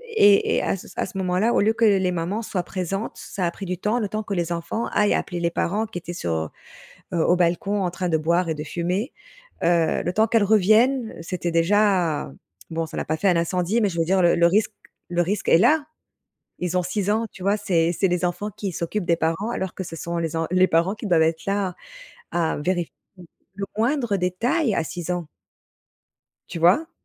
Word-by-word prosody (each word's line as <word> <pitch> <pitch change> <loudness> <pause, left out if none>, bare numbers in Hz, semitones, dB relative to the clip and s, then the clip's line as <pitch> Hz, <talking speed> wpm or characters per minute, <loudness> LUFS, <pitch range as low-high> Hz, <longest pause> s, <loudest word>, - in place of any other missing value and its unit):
et 205 - +5
et - - +2
à - - -1 0.3
à - - 0
ce 190 - -8
moment-là, 185 +4 +1
au - - +3
lieu 215 +2 +3
que 230 - -1
les 190 -3 +3
mamans 180 +5 -2
soient 185 -4 -2
présentes, 195 +4 -4
ça 185 - -4
a - - -1
pris 195 - -8
du 180 0 -3
temps, 210 +5 0
le 215 - -1
temps 215 +2 -3
que 205 - -4
les 175 -1 -1
enfants 170 +7 -2
aillent 210 0 +3
appeler 175 -2 -3
les 170 0 0
parents, 205 +6 -1
qui 215 - -7
étaient 175 0 -6
sur, 85 - -3 0.8
heu - - 0
heu, 160 - +3
au 175 - +4
balcon 180 +3 +1
en 180 - -1
train 180 0 -3
de 160 - +2
boire 170 +3 +1
et - - +1
de 150 - -5
fumer, 180 - -2 0.5
heu, 170 -1 +2
le 175 - -1
temps 220 +3 +3
qu'elles 225 -1 +3
reviennent, 220 +4 +3
c'était 175 0 -3
déjà 175 - +2 0.4
bon, 165 0 -2
ça - - -8
n'a - - -2
pas 155 - -1
fait 195 +5 +2
un 175 - +3
incendie, 180 +6 0
mais 205 - +2
je 170 - -6
veux 165 - +2
dire 190 +2 +2
le 175 -1 +4
le 170 - +4
risque 205 +6 +2 0.4
le 175 0 +1
risque 200 +5 -2
est - - +7
là. 290 - +4 0.8
Ils 180 0 -1
ont 180 - +2
6 185 +2 -2
ans, 220 +2 +1
tu 185 - -12
vois? 200 +1 +3
C'est 170 -5 +1
c'est 195 - +3
les 180 0 0
enfants 180 +4 -2
qui 195 -3 -3
s'occupent 175 +4 -3
des 170 - +4
parents, 165 +7 -1
alors 190 -5 -3
que 190 - -5
ce 165 - -8
sont 170 +1 -4
les 165 -2 -2
en 165 0 0
les 185 +1 +4
parents 170 +5 +2
qui 215 - -6
doivent 170 -4 +4
être 160 0 0
là, 195 -2 -1 0.6
à 165 -2 0
vérifier 175 +2 -1 0.6
le 195 -1 -3
moindre 235 -2 +1
détail, 225 - 0
à - - +1
6 175 +1 -5
ans. 175 -2 -2 1.2
Tu - - -5
vois? 190 - +3
180 Hz, 225 wpm, -23 LUFS, 170-205 Hz, 1.2 s, est